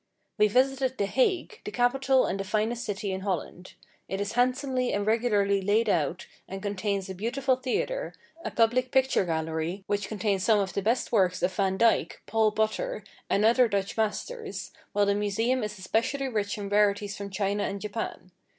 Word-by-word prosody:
We 210 - +6
visited 260 +3 +1
the 200 - +1
Hague, 385 - 0
the - - -5
capital 260 +3 +2
and 195 - -2
the - - -1
finest 220 +4 -1
city 205 -1 -3
in 190 0 -3
Holland. 185 -1 -4 0.3
It 195 - -2
is 200 0 -2
handsomely 255 +1 +1
and 205 0 0
regularly 210 -3 +2
laid 210 +4 +2
out, 170 -1 0 0.2
and 195 - -6
contains 200 -1 -2
a 190 - -5
beautiful 255 +7 0
theatre, - - -2 0.3
a - - -2
public 245 +2 +2
picture 265 -6 +2
gallery, 160 +3 -2
which 205 -1 -1
contains 205 -3 -1
some 220 -1 +4
of 195 -2 -1
the 200 - -1
best 230 +5 0
works 185 -5 +2
of 185 +1 +1
Vandyke, 195 +4 +1
Paul 220 -1 +2
Potter, 220 - -1 0.3
and 205 +2 +3
other 240 +2 +5
Dutch 200 -3 -2
masters, 410 - -3 0.2
while 205 0 +2
the 200 - +2
museum 220 +5 0
is 210 0 -4
especially 235 +8 -1
rich 210 -3 -2
in 205 -1 -4
rarities 205 0 +2
from 200 0 -6
China 200 +1 -1
and 200 +1 -3
Japan. 205 -3 -5
210 Hz, 180 wpm, -27 LUFS, 195-245 Hz, 0.3 s, We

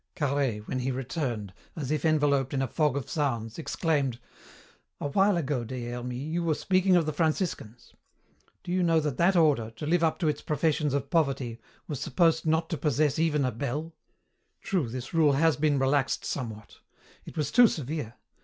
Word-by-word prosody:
Carhaix, 135 -8 -1
when 130 - -2
he 130 +1 -1
returned, 125 - -3 0.2
as 145 -4 -4
if 155 - 0
enveloped 145 -4 +2
in 135 - +1
a - - -1
fog 150 +2 +1
of 135 - -4
sounds, 120 -5 -2
exclaimed, 145 -6 0 0.8
"A 145 - -3
while 195 +5 +3
ago, 145 -6 -1
Des 120 0 -5
Hermies, 125 +5 -5
you 170 0 0
were 160 -2 +1
speaking 185 +1 +2
of 170 -3 +3
the 155 - -2
Franciscans. 155 - -2 0.7
Do 175 - -5
you 185 +1 +1
know 165 -2 +3
that 150 -4 -2
that 180 +3 +3
order, 145 -10 +3
to 150 - -6
live 170 +2 +2
up 160 - +2
to 170 - -1
its 150 -1 -1
professions 150 -1 0
of 140 -1 -3
poverty, 135 -7 0 0.3
was 145 -5 -4
supposed 165 -2 +2
not 160 +1 +2
to 165 - -1
possess 150 0 +1
even 150 -4 +2
a 130 - 0
bell? 145 +8 -4 0.7
True, 175 - 0
this 125 +1 -6
rule 155 -3 +4
has 160 +2 +3
been 150 -1 +1
relaxed 135 0 +1
somewhat. 110 -5 -6 0.5
It - - -11
was 150 - -1
too 245 -1 +7
severe! 145 - -4
145 Hz, 185 wpm, -28 LUFS, 130-160 Hz, 0.8 s, too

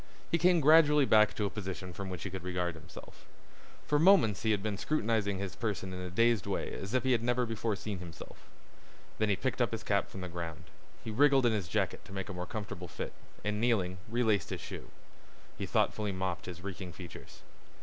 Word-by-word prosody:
He 170 - +3
came 175 0 +5
gradually 150 -1 +7
back 110 -3 +5
to 105 - 0
a 100 - -2
position 95 -3 -5
from 95 +1 -5
which 90 -3 -5
he 95 - -4
could 95 -1 -5
regard 90 -1 -1
himself. 80 +2 -13 0.6
For 150 - +2
moments 160 - +5
he 110 - 0
had 105 -2 +1
been 105 -2 -2
scrutinizing 110 -8 0
his 95 -2 -4
person 100 -4 -3
in 90 - -5
a 90 - -5
dazed 115 +3 +2
way - - -2
as 100 +6 -4
if 130 - +2
he 130 - +2
had 120 -3 +3
never 120 +1 +1
before 115 -1 -1
seen 100 -1 -5
himself. 85 -2 -11 0.7
Then 110 -1 +2
he 100 - +3
picked 130 +5 -2
up 120 - +2
his 115 - -4
cap 100 -1 +1
from 95 - -8
the 90 - -4
ground. 85 -1 -6 0.4
He 110 - -4
wriggled 135 +2 +5
in 120 - +4
his 100 -5 -1
jacket - - -1
to - - -11
make 95 0 -4
a - - -4
more 90 0 -5
comfortable 100 -4 -5
fit, - - -6 0.3
and 105 0 -1
kneeling 95 -7 +1
relaced 110 -5 +1
his - - -4
shoe. - - -8 0.7
He - - -4
thoughtfully 105 -2 +1
mopped 95 -2 -3
his 90 -1 -7
reeking 95 -2 -6
features. 90 -1 -11
105 Hz, 215 wpm, -32 LUFS, 90-115 Hz, 0.7 s, gradually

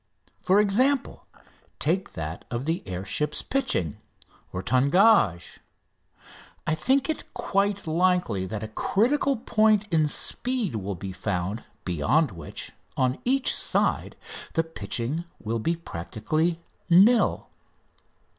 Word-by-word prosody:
For 190 +2 +4
example, 250 +7 +1 0.5
take 180 +5 0
that 80 0 -5
of 120 +2 -3
the 165 +3 -1
air 95 +1 -4
ship's 150 +10 -1
pitching 95 - 0 0.5
(tangage). 125 - +3 1.1
I 155 - +1
think 265 - +2
it 315 - -3
quite 200 0 0
likely 165 - +1
that 110 +1 -5
a - - -3
critical 255 - +1
point 215 -2 +3
in 155 -2 +3
speed 235 - -1
will 100 -1 -4
be 95 +2 -6
found, 100 +2 -3 0.2
beyond 110 - +2
which, 80 -5 -7 0.3
on 130 0 +1
each 270 +2 +2
side, - - 0 0.4
the 165 - +2
pitching 145 +2 -3
will 115 +1 -2
be 165 +10 0
practically 155 - -2 0.3
nil. 205 +8 +5
160 Hz, 115 wpm, -26 LUFS, -, 1.1 s, nil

